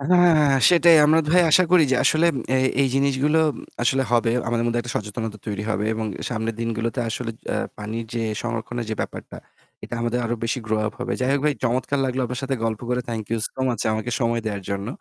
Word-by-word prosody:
আ -, -, -6 dB
হ্যাঁ, 175 Hz, -1 st, +6 dB
হ্যাঁ, 140 Hz, -3 st, +4 dB
সেটাই। 170 Hz, -1 st, +6 dB
আমরা, 160 Hz, +2 st, +5 dB
ভাই, 180 Hz, +1 st, +5 dB
আশা 185 Hz, +4 st, +6 dB
করি 180 Hz, -3 st, +7 dB
যে -, -, +4 dB
আসলে 155 Hz, +2 st, +4 dB, 0.3 s
এ -, -, +4 dB, 0.3 s
এই 135 Hz, -, +2 dB
জিনিসগুলো 140 Hz, +3 st, +2 dB, 0.4 s
আসলে 130 Hz, +2 st, +2 dB
হবে। 115 Hz, -1 st, +3 dB, 0.2 s
আমাদের 115 Hz, 0 st, 0 dB
মধ্যে 120 Hz, 0 st, 0 dB
একটা 120 Hz, -1 st, -6 dB
সচেতনতা 105 Hz, +1 st, -4 dB
তৈরি 105 Hz, -1 st, -3 dB
হবে। 105 Hz, 0 st, -1 dB
এবং 110 Hz, 0 st, -3 dB, 0.2 s
সামনের 115 Hz, -1 st, -3 dB
দিনগুলোতে 115 Hz, +1 st, -2 dB
আসলে-এ 115 Hz, 0 st, -5 dB, 0.2 s
পানির 110 Hz, +2 st, -4 dB
যে 115 Hz, -, -1 dB, 0.2 s
সংরক্ষণের 120 Hz, 0 st, -4 dB
যে -, -, -1 dB
ব্যাপারটা, -, -, -6 dB, 0.5 s
এটা -, -, -6 dB
আমাদের 120 Hz, +1 st, -1 dB
আরও 120 Hz, +1 st, -1 dB
বেশি 115 Hz, +3 st, -1 dB
গ্রো 110 Hz, 0 st, 0 dB
আপ -, -, -3 dB
হবে। 125 Hz, 0 st, -2 dB
যাই 130 Hz, -, +1 dB
হোক, 140 Hz, -, +1 dB
ভাই, 150 Hz, -1 st, +2 dB
চমৎকার 130 Hz, +4 st, 0 dB
লাগল 130 Hz, 0 st, -2 dB
আপনার 125 Hz, +2 st, -4 dB
সাথে 135 Hz, 0 st, -1 dB
গল্প 110 Hz, -2 st, -2 dB
করে। 125 Hz, 0 st, 0 dB
থ্যাংক 110 Hz, -2 st, -3 dB
ইউ 115 Hz, -, 0 dB
সো -, -, -10 dB
মাচ 115 Hz, -3 st, -2 dB
আমাকে 110 Hz, +2 st, -3 dB
সময় 115 Hz, 0 st, +1 dB
দেওয়ার 100 Hz, -2 st, -3 dB
জন্য। 100 Hz, +1 st, -3 dB
120 Hz, 215 wpm, -23 LUFS, 115-135 Hz, 0.5 s, করি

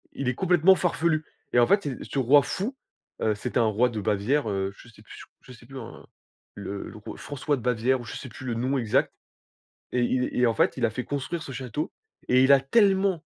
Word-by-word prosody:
Il 140 Hz, -, -2 dB
est 125 Hz, -, +1 dB
complètement 180 Hz, +3 st, +4 dB
farfelu 165 Hz, -3 st, 0 dB, 0.3 s
et -, -, +3 dB
en 120 Hz, -, +6 dB
fait, 200 Hz, +7 st, +3 dB
c'est 140 Hz, -7 st, -5 dB
ce -, -, -5 dB
roi 135 Hz, +3 st, +5 dB
fou, 220 Hz, -, -3 dB, 0.5 s
heu, 110 Hz, -, +2 dB
c'était 125 Hz, +4 st, -3 dB
un 120 Hz, -, +4 dB
roi 110 Hz, +3 st, +2 dB
de 110 Hz, -3 st, -4 dB
Bavière, 110 Hz, +5 st, 0 dB
heu, 95 Hz, 0 st, -2 dB
je -, -, -15 dB
sais 115 Hz, -3 st, -18 dB
plus -, -, -13 dB, 0.2 s
je -, -, -13 dB
sais 120 Hz, -1 st, -16 dB
plus 135 Hz, +2 st, -9 dB
en 115 Hz, -2 st, -10 dB, 0.5 s
le 100 Hz, 0 st, -6 dB
le -, -, -12 dB
r 105 Hz, -, -9 dB
François 145 Hz, +1 st, -2 dB
de 125 Hz, -, -8 dB
Bavière 125 Hz, +2 st, +1 dB
ou -, -, -9 dB
je 120 Hz, -, -7 dB
sais 130 Hz, -, -7 dB
plus 120 Hz, +2 st, -11 dB
le 120 Hz, -, -1 dB
nom 130 Hz, +4 st, -1 dB
exact 115 Hz, -4 st, +1 dB, 0.8 s
et 125 Hz, -, +1 dB
il 125 Hz, +1 st, +1 dB
et 125 Hz, -, +3 dB
en 115 Hz, -, +2 dB
fait, 165 Hz, +3 st, +2 dB
il 125 Hz, -, -1 dB
a -, -, -2 dB
fait 125 Hz, +3 st, -5 dB
construire 145 Hz, +4 st, -4 dB
ce 140 Hz, -, -8 dB
château 130 Hz, +3 st, -4 dB, 0.4 s
et 125 Hz, +1 st, +5 dB
il 135 Hz, -, +6 dB
a 140 Hz, -, +7 dB
tellement, 190 Hz, -, +2 dB
130 Hz, 240 wpm, -26 LUFS, 115-150 Hz, 0.8 s, a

